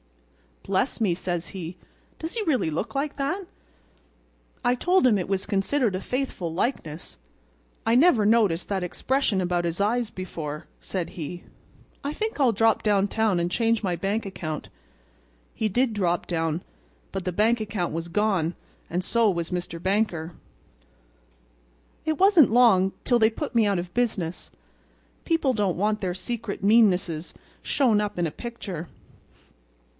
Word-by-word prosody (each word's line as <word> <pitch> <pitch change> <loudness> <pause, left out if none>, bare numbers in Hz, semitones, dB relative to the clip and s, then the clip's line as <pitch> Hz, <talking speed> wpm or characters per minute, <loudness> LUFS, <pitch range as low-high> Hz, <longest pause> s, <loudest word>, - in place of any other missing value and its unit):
'Bless - - 0
me,' 195 -6 +3
says 175 -1 -3
he, 180 -2 -7 0.4
'does 325 +1 -5
he 460 - -2
really 265 - +1
look 160 +8 -3
like 285 +1 -2
that?" 355 +8 -2 1.2
I 245 - +3
told 360 +6 +3
him 230 -5 +5
it 180 - -2
was 195 -1 0
considered 205 +2 +1
a 185 - -3
faithful 250 -9 -3
likeness. 165 - -3 0.7
'I 225 +1 +3
never 255 -6 +5
noticed 210 -6 +3
that 195 -2 -1
expression 220 +3 0
about 175 -1 0
his 170 +1 -2
eyes 230 +2 +1
before,' 160 -6 -6
said 185 -3 -4
he; 175 +1 -6 0.6
'I 285 +1 -2
think 440 0 -3
I'll 260 -4 +5
drop 225 +1 +3
downtown 205 -1 +2
and 170 0 0
change 230 +2 +1
my 180 -3 0
bank 200 +5 -1
account.' 155 -5 -5 0.8
He 220 - 0
did 245 +3 +1
drop 175 -4 0
down, 165 -1 -1 0.5
but 195 -1 -4
the 180 - 0
bank 220 +6 +2
account 205 -6 -2
was 165 +1 -3
gone 185 -3 +1 0.3
and 180 +2 -1
so 230 +2 +3
was 170 -3 -2
Mr. 175 -2 -4
Banker. 185 -4 0 1.7
"It 315 -1 0
wasn't 370 - +6
long 215 -6 +5
till 240 -2 +3
they 220 -1 +5
put 285 +6 -5
me 225 -2 +5
out 200 -3 +1
of 175 0 -6
business. 195 -9 -1 0.8
People 325 -5 +2
don't 200 -7 0
want 210 +2 0
their 180 -2 -2
secret 225 -1 -4
meannesses 190 -6 +3 0.3
shown 230 -7 +2
up 210 -3 -3
in 175 - +1
a 160 - -2
picture. 195 -6 -6
200 Hz, 150 wpm, -25 LUFS, 175-235 Hz, 1.7 s, wasn't